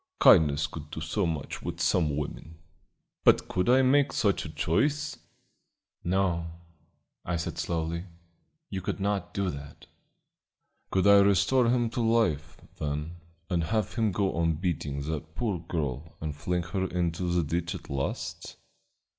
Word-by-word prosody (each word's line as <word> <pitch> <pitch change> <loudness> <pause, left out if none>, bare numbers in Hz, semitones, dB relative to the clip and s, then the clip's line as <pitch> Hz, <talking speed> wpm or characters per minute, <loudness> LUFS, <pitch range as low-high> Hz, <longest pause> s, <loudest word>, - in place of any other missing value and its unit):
Kindness 75 -1 +6
could 75 -1 -8
do 80 - -6
so 85 +5 -1
much 80 -4 -4
with 85 0 -5
some 80 -3 +2
women. 80 +2 -6 0.7
But - - +5
could 90 +5 0
I 130 +2 +6
make 140 +2 +4
such 100 -3 +1
a - - -5
choice?" 145 - 0 0.8
"No," 90 -2 +1 0.8
I 90 - -2
said 85 - -3
slowly, 85 +1 -2 0.7
"you 95 -2 -3
could 90 - -3
not 100 -2 -1
do 100 -2 -1
that." 70 0 -10 1.0
"Could 95 0 +1
I 100 0 +8
restore 100 +6 +4
him 120 -2 +1
to 120 - -1
life, 95 -10 +1 0.2
then, 75 +3 -3 0.3
and 85 -4 0
have 110 +1 -1
him 110 -3 +1
go 95 +1 0
on 85 0 +2
beating 75 -4 -2
that 80 +1 -5
poor 105 -7 -1
girl 80 -3 -4
and 75 -2 -4
flinging 90 +2 -2
her 95 0 0
into 85 0 -1
the 85 -1 +2
ditch 85 +3 -2
at - - -9
last?" 70 -1 -4
85 Hz, 150 wpm, -28 LUFS, 80-100 Hz, 1.0 s, I